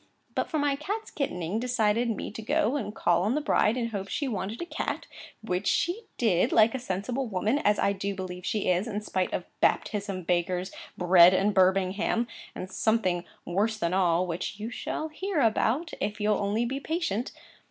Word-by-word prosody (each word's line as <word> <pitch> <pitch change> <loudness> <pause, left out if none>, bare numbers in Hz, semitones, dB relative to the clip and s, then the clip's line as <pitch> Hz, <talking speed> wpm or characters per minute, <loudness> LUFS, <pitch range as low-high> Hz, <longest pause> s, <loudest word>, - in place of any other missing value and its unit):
For 315 - -2
my 290 -1 +2
cat's 410 +10 -4
kittening 185 - -2
decided 235 -1 +1
me 225 - -3
to 220 - -7
go 290 +3 +1
and 215 -6 -3
call 175 0 +2
on 215 +7 +1
the - - +2
bride, 245 -5 +2
in 235 -2 -1
hopes 200 -3 -5
she 285 - -1
wanted 210 -2 -3
a 345 - -3
cat; - - -3 0.4
which 180 -4 -2
she 390 +7 +1
did 195 -7 +2
like 220 0 +5
a 260 - -2
sensible 240 +4 -2
woman, 215 +6 0
as 210 -6 +3
I 200 - +2
do 200 0 -3
believe 180 -1 -6
she 215 +1 -1
is, 180 +5 +1
in 210 -2 -3
spite 185 -3 -1
of - - -2 0.2
Baptism, 200 -3 0
Bakers, 180 +2 0 0.3
Bread, 180 0 +7
and 200 +2 +2
Birmingham, 190 +4 +2 0.3
and 185 - -5
something 190 -4 +1 0.2
worse 210 +5 0
than 170 -4 -1
all, 180 -2 +3
which 180 +3 -4
you 220 +3 -4
shall 315 +5 -4
hear 370 +2 -2
about, 265 +7 +2
if 210 +1 -2
you'll 210 0 +2
only 205 +4 0
be 265 +3 -2
patient. 280 - -2
210 Hz, 185 wpm, -28 LUFS, 185-250 Hz, 0.4 s, Bread